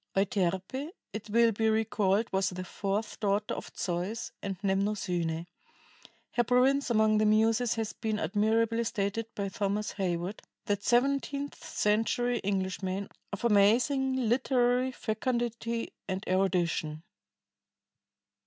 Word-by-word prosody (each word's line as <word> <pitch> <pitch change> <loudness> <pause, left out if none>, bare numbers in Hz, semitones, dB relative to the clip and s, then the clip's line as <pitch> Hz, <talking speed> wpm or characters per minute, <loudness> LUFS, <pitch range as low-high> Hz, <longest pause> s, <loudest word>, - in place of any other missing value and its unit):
Euterpe, 195 - 0 0.2
it 215 0 -6
will 230 +2 +4
be 220 +1 +1
recalled, 220 -1 +2
was 190 0 +2
the 185 0 -5
fourth 200 +3 -3
daughter 205 0 0
of - - -6
Zeus 180 +5 -2
and 195 -2 -4
Mnemosyne. 185 -4 0 0.9
Her 240 - +2
province 255 +3 +3
among 215 -2 +4
the 215 - +3
Muses 225 +2 +3
has 225 -1 -2
been 220 -1 -2
admirably 220 +5 +1
stated 215 0 -2
by 200 -1 -2
Thomas 200 +2 -1
Heywood, 185 0 -2 0.2
that 205 -1 0
seventeenth 275 +4 0
century 225 +3 +1
Englishman 190 0 -2 0.2
of 200 +3 -4
amazing 245 +6 +4
literary 250 +1 +2
fecundity 235 0 -2
and 190 0 -3
erudition. 175 -4 0
215 Hz, 115 wpm, -30 LUFS, 195-235 Hz, 0.9 s, will